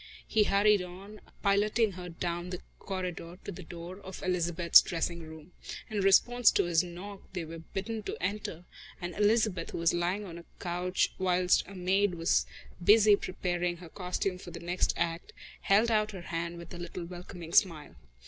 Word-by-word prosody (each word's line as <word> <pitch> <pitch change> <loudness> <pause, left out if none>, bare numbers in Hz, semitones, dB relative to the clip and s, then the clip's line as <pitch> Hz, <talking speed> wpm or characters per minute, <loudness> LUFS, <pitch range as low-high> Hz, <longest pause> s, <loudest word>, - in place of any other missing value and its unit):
He 215 -2 +3
hurried 200 0 +4
on, 195 +4 -10 0.2
piloting 210 +2 +3
her 180 -1 -8
down 175 +1 -3
the 180 -1 -5 0.2
corridor 180 -2 -5
to - - -4
the 190 - -8
door 175 +2 -9
of 190 -1 -9
Elizabeth's 175 -2 +5
dressing 170 0 -2
room. 160 +1 -11 0.4
In 210 - -1
response 230 +5 +5
to - - +3
his 170 -1 +2
knock 190 +3 -8
they 175 -3 -3
were 165 +1 -8
bidden 205 +6 -5
to - - -5
enter, 185 -3 -3 0.4
and 175 -1 -5
Elizabeth, 210 -3 +2
who - - -5
was 170 0 +2
lying 180 +4 -1
on 170 -3 -8
a 170 - -14
couch 180 +1 -1
whilst 180 -1 +2
a 200 - -10
maid 190 +1 +1
was 165 +1 +2 0.4
busy 210 +2 +7
preparing 175 -2 -2
her 170 -1 -11
costume 180 +1 -3
for 180 - -9
the 170 - -8
next 175 +2 0
act, 170 0 -2 0.3
held 215 +4 +3
out 215 -1 +1
her 190 - -7
hand 170 0 -4
with 170 0 -10
a 175 - -7
little 175 0 -6
welcoming 175 -1 -9
smile. 165 -7 +2
180 Hz, 175 wpm, -30 LUFS, 170-200 Hz, 0.4 s, busy